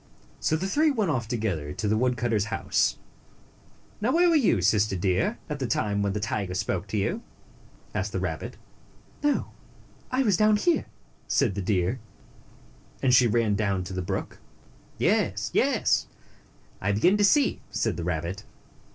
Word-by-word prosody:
So 155 Hz, -, +1 dB
the 165 Hz, +4 st, -2 dB
three 305 Hz, +10 st, +3 dB
went 215 Hz, -, 0 dB
off 120 Hz, -6 st, -2 dB
together 100 Hz, -11 st, -2 dB
to 105 Hz, -, -3 dB
the 105 Hz, -, +2 dB
wood 125 Hz, +2 st, +1 dB
cutter's 115 Hz, -4 st, 0 dB
house. 95 Hz, -5 st, 0 dB, 0.5 s
" -, -, -30 dB
Now, 230 Hz, +5 st, +2 dB
where 345 Hz, +3 st, +4 dB
were 335 Hz, -, +3 dB
you, 225 Hz, -, +3 dB
Sister 105 Hz, +1 st, +3 dB
Deer, 95 Hz, -, 0 dB
at 150 Hz, -2 st, -4 dB
the 130 Hz, -, -1 dB
time 105 Hz, -3 st, 0 dB
when 100 Hz, -1 st, 0 dB
the 105 Hz, -, -2 dB
tiger 100 Hz, -3 st, -2 dB
spoke 95 Hz, 0 st, -2 dB
to 105 Hz, -, -3 dB
you?" 170 Hz, -, -1 dB, 0.7 s
asked -, -, -2 dB
the -, -, -2 dB
rabbit. -, -, -4 dB, 0.7 s
"Oh, 290 Hz, 0 st, +1 dB, 0.6 s
I 260 Hz, +1 st, +1 dB
was 205 Hz, -7 st, +3 dB
down 215 Hz, 0 st, +4 dB
here," 335 Hz, +11 st, +1 dB, 0.4 s
said 105 Hz, -, +2 dB
the 100 Hz, -, -3 dB
deer, 95 Hz, +4 st, 0 dB, 1.0 s
and 130 Hz, -2 st, +4 dB
she 125 Hz, -1 st, +6 dB
ran 115 Hz, -2 st, +2 dB
down 100 Hz, -3 st, 0 dB
to 90 Hz, -, -7 dB
the 95 Hz, -, -2 dB
brook. 90 Hz, -, -4 dB, 0.6 s
"Yes, -, -, +1 dB
yes! -, -, +2 dB, 0.7 s
I 100 Hz, +2 st, +1 dB
begin 175 Hz, -, +4 dB
to 205 Hz, -, +2 dB
see," 280 Hz, +7 st, +3 dB
said -, -, -1 dB
the 85 Hz, -, -4 dB
rabbit. 90 Hz, +4 st, -3 dB
110 Hz, 170 wpm, -26 LUFS, -, 1.0 s, she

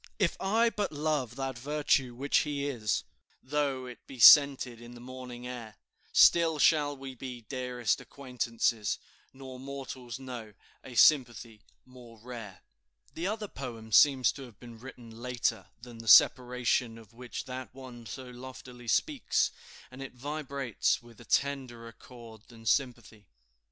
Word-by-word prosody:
"If 190 Hz, -6 st, +1 dB
I 225 Hz, +4 st, +2 dB
but 205 Hz, -2 st, -2 dB
love 145 Hz, -5 st, -2 dB
that 135 Hz, -2 st, -4 dB
virtue 140 Hz, -2 st, 0 dB
which 140 Hz, +3 st, +1 dB
he 145 Hz, -2 st, -2 dB
is, 110 Hz, -8 st, -1 dB, 0.4 s
Though 140 Hz, -2 st, -1 dB
it 125 Hz, -1 st, -12 dB
be 135 Hz, -, -10 dB
scented 130 Hz, -2 st, +7 dB
in 120 Hz, +1 st, -11 dB
the -, -, -11 dB
morning 125 Hz, 0 st, -9 dB
air, 120 Hz, -3 st, -8 dB, 0.4 s
Still 165 Hz, -2 st, +5 dB
shall 145 Hz, -1 st, +3 dB
we 135 Hz, 0 st, -8 dB
be 125 Hz, -1 st, -8 dB
dearest 125 Hz, -3 st, -2 dB
acquaintances, 120 Hz, -5 st, -2 dB, 0.3 s
Nor 130 Hz, -1 st, -10 dB
mortals 130 Hz, -2 st, -7 dB
know 120 Hz, -6 st, -8 dB, 0.3 s
a 130 Hz, -, -10 dB
sympathy 120 Hz, -5 st, +3 dB, 0.2 s
more 125 Hz, -3 st, -15 dB
rare." 115 Hz, -4 st, -9 dB, 0.5 s
The 170 Hz, +3 st, -3 dB
other 215 Hz, +1 st, -3 dB
poem 115 Hz, -, -8 dB
seems 130 Hz, +1 st, +5 dB
to 140 Hz, -, -11 dB
have 120 Hz, -6 st, -12 dB
been 120 Hz, -2 st, -12 dB
written 120 Hz, -2 st, -12 dB
later 125 Hz, -1 st, -2 dB
than 120 Hz, -1 st, -12 dB
the 115 Hz, -, -10 dB
separation 125 Hz, 0 st, +4 dB
of 115 Hz, 0 st, -16 dB
which 120 Hz, +1 st, -7 dB
that 130 Hz, 0 st, -7 dB
one 125 Hz, -3 st, -11 dB
so 130 Hz, +5 st, -7 dB
loftily 125 Hz, -1 st, -11 dB
speaks; -, -, +1 dB, 0.4 s
and 130 Hz, +1 st, -10 dB
it 135 Hz, -1 st, -8 dB
vibrates 140 Hz, -3 st, -2 dB
with 120 Hz, -1 st, -16 dB
a -, -, -14 dB
tenderer 125 Hz, -5 st, -1 dB
chord 115 Hz, -2 st, -14 dB
than 115 Hz, -2 st, -15 dB
sympathy. 120 Hz, -5 st, -1 dB
125 Hz, 145 wpm, -30 LUFS, 120-135 Hz, 0.5 s, scented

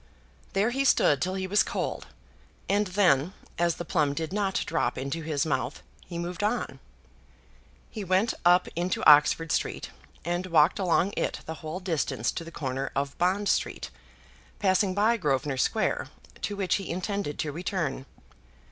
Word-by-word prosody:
There 205 Hz, +5 st, +2 dB
he 270 Hz, +2 st, 0 dB
stood 145 Hz, -, +4 dB
till 185 Hz, +1 st, -1 dB
he 190 Hz, -1 st, -2 dB
was 205 Hz, +3 st, +3 dB
cold, -, -, -3 dB, 0.6 s
and 205 Hz, +1 st, +2 dB
then, 180 Hz, -4 st, +3 dB, 0.3 s
as 170 Hz, -1 st, +2 dB
the 175 Hz, -, -6 dB
plum 150 Hz, -4 st, +1 dB
did 160 Hz, +3 st, -3 dB
not 200 Hz, -2 st, 0 dB
drop 160 Hz, -7 st, -1 dB
into 140 Hz, +5 st, -3 dB
his 155 Hz, -2 st, -1 dB
mouth, 140 Hz, -2 st, -2 dB, 0.2 s
he 170 Hz, -, -6 dB
moved 175 Hz, +1 st, -4 dB
on. 220 Hz, +4 st, -1 dB, 1.1 s
He 215 Hz, -, -5 dB
went 190 Hz, +4 st, +2 dB
up 180 Hz, +1 st, +5 dB
into 175 Hz, +2 st, 0 dB
Oxford 150 Hz, +2 st, +6 dB
Street, -, -, -2 dB, 0.3 s
and 175 Hz, +2 st, -1 dB
walked 165 Hz, 0 st, +4 dB
along 185 Hz, +1 st, +2 dB
it -, -, -2 dB
the 160 Hz, -, -4 dB
whole 160 Hz, +3 st, -5 dB
distance 160 Hz, -, -1 dB
to -, -, -5 dB
the 165 Hz, -, -9 dB
corner 135 Hz, -3 st, -3 dB
of 140 Hz, +1 st, -1 dB
Bond 190 Hz, +3 st, +1 dB
Street, -, -, -1 dB, 0.7 s
passing 190 Hz, 0 st, +2 dB
by 220 Hz, +3 st, +3 dB
Grosvenor 140 Hz, -, 0 dB
Square, 215 Hz, -, 0 dB, 0.3 s
to 205 Hz, -, -2 dB
which 195 Hz, -2 st, +1 dB
he 195 Hz, -, -7 dB
intended 185 Hz, -3 st, -3 dB
to 150 Hz, -, -2 dB
return. 155 Hz, -5 st, -3 dB
175 Hz, 160 wpm, -27 LUFS, 150-195 Hz, 1.1 s, Oxford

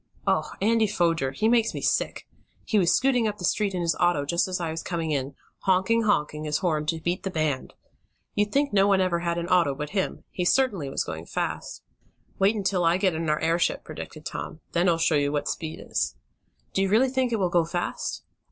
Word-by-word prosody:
"Oh, -, -, +1 dB
Andy 225 Hz, 0 st, +3 dB
Foger! 165 Hz, -8 st, +1 dB
He 140 Hz, +11 st, 0 dB
makes 230 Hz, -1 st, +3 dB
me -, -, -4 dB
sick! -, -, 0 dB, 0.4 s
He 215 Hz, -, +2 dB
was 175 Hz, -2 st, +3 dB
scooting 250 Hz, -2 st, +3 dB
up 210 Hz, -1 st, -3 dB
the 180 Hz, -, -4 dB
street 200 Hz, +2 st, +1 dB
in 180 Hz, -, -1 dB
his 170 Hz, -1 st, +1 dB
auto 175 Hz, -5 st, +2 dB
just 170 Hz, +5 st, +1 dB
as 185 Hz, -1 st, -2 dB
I 165 Hz, -2 st, -2 dB
was 160 Hz, -, -4 dB
coming 165 Hz, -3 st, -3 dB
in, 135 Hz, -1 st, -2 dB, 0.2 s
'honking 195 Hz, +5 st, +2 dB
honking' 150 Hz, -6 st, 0 dB
his 150 Hz, 0 st, 0 dB
horn 155 Hz, -5 st, -1 dB
to 165 Hz, +1 st, 0 dB
beat 175 Hz, +3 st, -2 dB
the 195 Hz, -, -3 dB
band! 155 Hz, -6 st, -2 dB, 0.6 s
You'd 205 Hz, 0 st, 0 dB
think 280 Hz, -2 st, +1 dB
no 195 Hz, 0 st, +5 dB
one 195 Hz, -1 st, +4 dB
ever 185 Hz, -2 st, +1 dB
had 170 Hz, 0 st, -1 dB
an 170 Hz, 0 st, -2 dB
auto 175 Hz, -6 st, +3 dB
but 150 Hz, +1 st, -5 dB
him. 195 Hz, -2 st, -2 dB
He 180 Hz, -, -2 dB
certainly 195 Hz, -, +2 dB
was -, -, -1 dB
going 80 Hz, +1 st, -7 dB
fast." -, -, -4 dB, 0.6 s
"Wait 200 Hz, +3 st, +4 dB
until 190 Hz, -3 st, 0 dB
I 170 Hz, +1 st, +4 dB
get 190 Hz, -2 st, +2 dB
in 160 Hz, 0 st, -2 dB
our 150 Hz, -, +1 dB
airship," 165 Hz, +1 st, +1 dB
predicted 155 Hz, 0 st, -9 dB
Tom. 155 Hz, -, -6 dB
"Then 175 Hz, +1 st, +2 dB
I'll 165 Hz, -, +3 dB
show 165 Hz, 0 st, +2 dB
you 145 Hz, -1 st, +2 dB
what 145 Hz, -1 st, -1 dB
speed 160 Hz, -1 st, -4 dB
is!" -, -, -1 dB, 0.6 s
"Do -, -, +1 dB
you 195 Hz, -, +1 dB
really 235 Hz, +6 st, +4 dB
think 260 Hz, -1 st, 0 dB
it 225 Hz, -, +1 dB
will 185 Hz, -3 st, +1 dB
go 175 Hz, -1 st, +3 dB
fast?" 175 Hz, +2 st, -3 dB
175 Hz, 225 wpm, -26 LUFS, 160-205 Hz, 0.6 s, no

